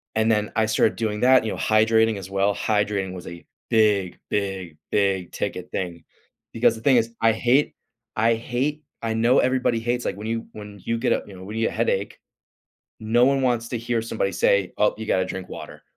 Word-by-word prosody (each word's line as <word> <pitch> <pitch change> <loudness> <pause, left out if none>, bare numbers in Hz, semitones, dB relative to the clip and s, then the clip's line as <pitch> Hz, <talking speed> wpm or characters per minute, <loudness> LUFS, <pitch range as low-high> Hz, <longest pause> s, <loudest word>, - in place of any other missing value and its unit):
And 110 +1 +2
then 105 -1 0
I 110 - +3
started 110 0 +2
doing 105 -2 -2
that, 130 -1 +5
you 110 - -1
know, - - -5
hydrating 110 0 +3
as 95 -1 -8
well. 100 +1 +1
Hydrating 100 -2 -1
was 90 -1 -9
a 85 0 -10 0.2
big, 105 -5 +2
big, 95 -5 -3
big 95 -3 +1
ticket - - -4
thing, 85 -2 -4 0.5
because 115 - +3
the 110 - -10
thing 135 0 +4
is, 115 0 +1
I 115 0 +5
hate 125 +6 +2 0.4
I 115 +2 +3
hate 130 +6 -2 0.2
I 115 -1 -1
know 115 +3 +3
everybody 130 -2 +1
hates 120 +2 -1
like - - -2
when 105 +2 -6
you 115 0 -3
when 105 -2 -10
you 115 - -1
get 120 +2 +1
up, - - -3
you 100 - -11
know, 95 - -11
when 105 +3 -7
you 115 - +1
get - - -4
a - - -8
headache, 100 -3 -1 0.8
no 115 +3 +3
one 135 0 +2
wants 120 -2 +1
to 120 - -2
hear 115 0 -1
somebody 110 -3 -2
say, 100 -1 +2
"Oh, 105 - +2
you 110 - -6
gotta 95 -3 +1
drink 95 0 -6
water," - - -9
110 Hz, 215 wpm, -23 LUFS, 100-115 Hz, 0.8 s, that